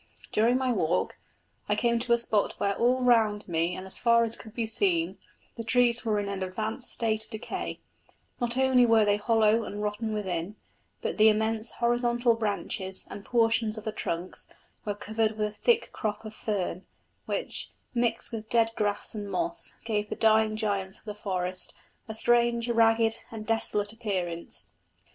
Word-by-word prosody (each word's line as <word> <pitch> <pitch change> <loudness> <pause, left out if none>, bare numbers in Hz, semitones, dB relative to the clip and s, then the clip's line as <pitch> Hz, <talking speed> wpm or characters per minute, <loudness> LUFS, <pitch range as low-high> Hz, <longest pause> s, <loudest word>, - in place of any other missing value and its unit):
During 235 +4 +3
my 260 -1 +1
walk 175 -8 0 0.5
I - - +3
came 235 -1 +2
to 240 0 +2
a - - +5
spot 220 -3 +1
where 200 - +1
all 250 +3 +2
round 220 -4 +3
me 170 0 0
and 185 - -7
as 190 - -4
far 235 -1 +5
as 230 0 -1
could 220 0 -12
be 230 - 0
seen 335 - +1 0.4
the 230 - -4
trees 240 0 +3
were 220 -3 +1
in 205 - -2
an 200 -1 -4
advanced 215 +6 -3
state 220 -1 0
of - - -21
decay: 220 +1 -5 0.6
not 240 0 -1
only 260 -1 +5
were 225 -2 +5
they 205 0 +3
hollow 220 +1 +3
and 210 0 -5
rotten 210 +2 -2
within, 190 -2 -3 0.5
but - - -2
the 215 +1 +8
immense 220 +1 +1
horizontal 240 0 +2
branches 200 -3 -2
and 200 - -7
portions 225 -1 +2
of 215 - -6
the 220 - -2
trunks 175 -3 -4 0.4
were 205 -1 -2
covered 220 +1 0
with 210 0 +1
a - - -7
thick 470 - +2
crop 215 0 -3
of 215 - -7
fern, 190 -4 -3 0.4
which, - - -2 0.2
mixed 235 -2 0
with 220 -1 -6
dead 230 -1 +3
grass 205 -1 -1
and 205 -2 -5
moss, 340 - -1
gave 210 -2 -1
the - - -3
dying 220 -1 +3
giants 200 -3 -2
of - - -21
the 210 - -4
forest 185 -3 -3 0.3
a 220 - -5
strange, 235 0 +3
ragged 225 -1 +3
and 220 -1 -7
desolate 210 -2 0
appearance. 185 -7 -3
220 Hz, 175 wpm, -28 LUFS, 205-235 Hz, 0.6 s, the